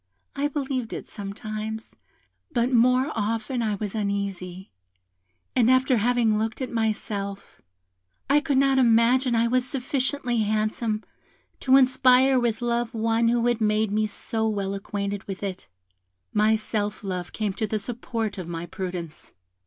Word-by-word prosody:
I 285 +1 +1
believed 265 -5 -3
it - - -6
sometimes, 215 +2 -6 0.6
but 245 -2 +1
more 255 +4 +4
often 225 +3 -1
I 215 -2 0
was 205 0 -4
uneasy, 200 - -3 0.8
and 245 -2 +4
after 255 0 +4
having 225 -1 +2
looked 225 +1 -2
at 260 -2 -4
myself, 210 -3 -3 0.7
I 285 +2 +5
could 285 -2 0
not 270 0 +4
imagine 240 +1 +4
I 230 +1 +3
was 255 +1 +2
sufficiently 260 -1 -1
handsome 215 +1 0 0.6
to 265 0 +5
inspire 260 0 +5
with 235 -1 -1
love 235 0 -1
one 225 +1 +2
who 235 0 +2
had 240 -1 +1
made 215 0 +2
me 215 +1 +1
so 220 +1 -2
well 200 -2 -2
acquainted 200 0 -4
with 195 0 -6
it. 190 -2 -5 0.7
My 215 +1 +4
self 210 -1 -3
love 180 -2 -4
came 210 -3 -2
to 220 +2 -2
the 215 - -1
support 225 -1 -4
of 180 - -6
my 170 0 -4
prudence. 175 -2 -6
225 Hz, 145 wpm, -25 LUFS, 205-250 Hz, 0.8 s, I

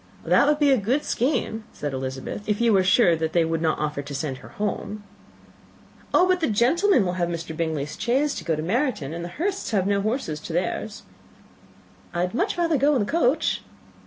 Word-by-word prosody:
"That 285 - +4
would 300 0 +3
be 290 -2 +4
a 265 - +4
good 250 +9 0
scheme," 240 -3 -1
said 145 -2 -4
Elizabeth, 130 +5 -4
"if 210 - +1
you 235 -2 +3
were 190 -1 +4
sure 185 -2 +4
that 160 0 -2
they 170 -2 +3
would 165 0 -1
not 160 -1 +1
offer 150 -1 -2
to 140 0 -7
send 140 -2 -3
her - - -13
home." 210 0 -4 1.1
"Oh, 365 - +5
but 370 -1 +2
the 320 - 0
gentlemen 255 - +3
will 180 - -1
have 175 - +1
Mr. 165 -1 -5
Bingley's 155 -2 -3
chaise 265 +6 +1
to - - -6
go 165 - 0
to 155 - -4
Meryton; 205 - -1
and 170 +1 -5
the 175 - -5
Hursts 390 +4 -2
have 195 -4 +1
no 200 0 +1
horses 215 - -2
to 160 - -7
theirs." 205 +4 -2 1.1
"I 175 - +1
had 180 +1 -1
much 385 - 0
rather 335 -3 +2
go 290 +2 +3
in 250 - +2
the - - -6
coach." 315 -2 +1
205 Hz, 215 wpm, -24 LUFS, 160-270 Hz, 1.1 s, Oh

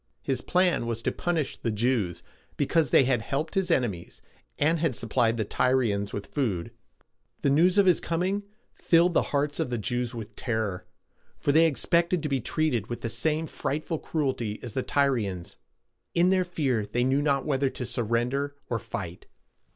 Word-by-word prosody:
His 130 -2 -1
plan 180 -9 +2
was 115 -1 -3
to - - +1
punish 165 -5 -2
the 115 - -2
Jews, 110 -5 0 0.3
because 150 +1 +2
they - - +6
had 125 -3 +1
helped 145 +7 -3
his 190 -2 0
enemies, 115 - -1 0.4
and 160 +3 +2
had 155 -6 0
supplied 115 0 +1
the 110 - 0
Tyrians 110 -4 +1
with 100 - -6
food. 105 - -1 0.7
The 140 - +3
news 175 +7 +4
of 200 - +6
his 180 -2 +5
coming 185 +4 -1 0.3
filled 170 +1 +3
the - - +4
hearts 145 0 0
of - - 0
the 120 - -1
Jews 120 +2 -2
with 110 -2 -8
terror, 110 -6 -2 0.5
for 145 - +1
they 160 +3 +6
expected 170 +3 +1
to 150 - -1
be 135 -2 0
treated 125 -6 0
with 120 - -5
the 115 - -2
same 150 +8 0
frightful 155 +1 -3
cruelty 130 -9 -2
as 120 -4 -6
the 130 - 0
Tyrians. 115 -12 0 0.6
In 175 +2 +4
their 185 -1 +3
fear 140 -10 0
they 120 +3 0
knew 135 +3 +2
not 140 -2 +1
whether 140 -2 +1
to 125 - -5
surrender 125 +4 -1 0.2
or 115 - 0
fight. 90 -3 -6
130 Hz, 175 wpm, -27 LUFS, 115-155 Hz, 0.7 s, they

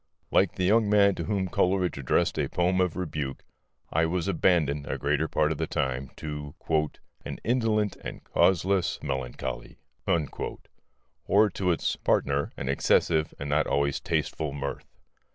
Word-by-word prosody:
Like - - +3
the 95 - -1
young 105 +3 +4
man 100 -1 +5
to 85 - -4
whom 100 -3 0
Coleridge 90 0 +1
addressed 65 - +1
a - - +1
poem 90 +1 +1
of 90 -3 0
rebuke, 75 -7 -4 0.5
I 80 +1 +3
was 90 +2 -1
abandoned, 80 -6 +2
a - - -2
greater 75 +2 0
part - - +1
of - - -3
the - - -1
time, 65 0 -2
to 75 -1 -6 0.7
"an - - -5
Indolent 110 -3 +1
and - - -8
Causeless 95 0 +2
Melancholy"; 65 -4 -4 1.5
or 105 +2 +5
to 90 0 -1
its 85 - 0
partner, 70 +1 +1
an - - -4
excessive 80 +3 +2
and 70 - -5
not 75 +1 +2
always 70 0 +1
tasteful 75 -3 -2
mirth. 70 -1 -5
80 Hz, 150 wpm, -27 LUFS, 70-95 Hz, 1.5 s, man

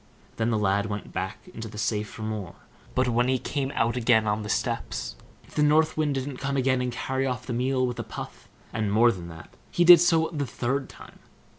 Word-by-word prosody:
Then 115 +1 +1
the 110 - +1
lad 100 0 +1
went 105 -1 -6
back 95 - -5
into 110 0 -6
the 105 - -10
safe 105 0 -1
for 110 - -8
more; 105 -5 -4 0.4
but 130 0 +2
when 120 +1 +2
he 130 0 +2
came 135 +2 -3
out 115 +1 +1
again 115 -2 +3
on 105 +1 0
the 105 - -6
steps, - - -2 0.3
if - - -19
the 150 - 0
North 155 +2 +4
Wind 150 -2 0
didn't 135 0 -3
come 140 +1 -2
again 130 -1 +2
and 125 0 -1
carry 130 +2 -2
off 125 -1 -3
the 125 - -4
meal 130 +2 +1
with 125 -1 -3
a - - -2
puff; - - -9 0.3
and, 110 -2 -1
more 115 +3 +5
than 90 -5 -7
that, 80 -1 -12 0.2
he 175 - +2
did 175 -1 +10
so 165 -2 +3
the 145 -3 -2
third 130 +4 -2
time. - - -14
125 Hz, 230 wpm, -26 LUFS, 110-135 Hz, 0.4 s, did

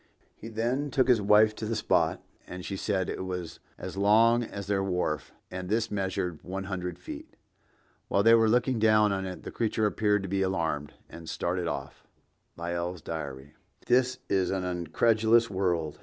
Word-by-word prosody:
He 110 - -10
then 120 +6 -1
took 130 -1 +2
his 120 -4 +4
wife 105 +2 +5
to 110 0 -5
the 115 - -1
spot, 110 - +1 0.2
and 90 0 -7
she 100 - -4
said 95 -1 -1
it - - -4
was 90 -3 -5 0.2
as - - -7
long 115 +4 +5
as 100 -3 -6
their 100 0 0
wharf, 90 -5 -2 0.2
and 90 0 -5
this 110 +1 0
measured 95 -4 -2
one 95 +2 -4
hundred 90 -3 -4
feet. 90 - -9 0.7
While 100 - +2
they 115 +1 +7
were 115 -1 +5
looking 125 +1 +2
down 110 -1 +4
on 95 -1 -2
it, 90 - -7
the - - -7
creature 110 -1 0
appeared 105 -1 +1
to - - -4
be 95 +1 -1
alarmed, 80 -6 -1
and 85 -1 -10
started 90 0 -2
off." - - -5 0.5
(Lyell's 85 0 -3
Diary.) 70 -3 -6 0.3
This 125 +1 +3
is 95 -2 +1
an 95 -1 -1
incredulous 110 +7 +2
world. 85 -5 -1
95 Hz, 175 wpm, -28 LUFS, 90-110 Hz, 0.7 s, they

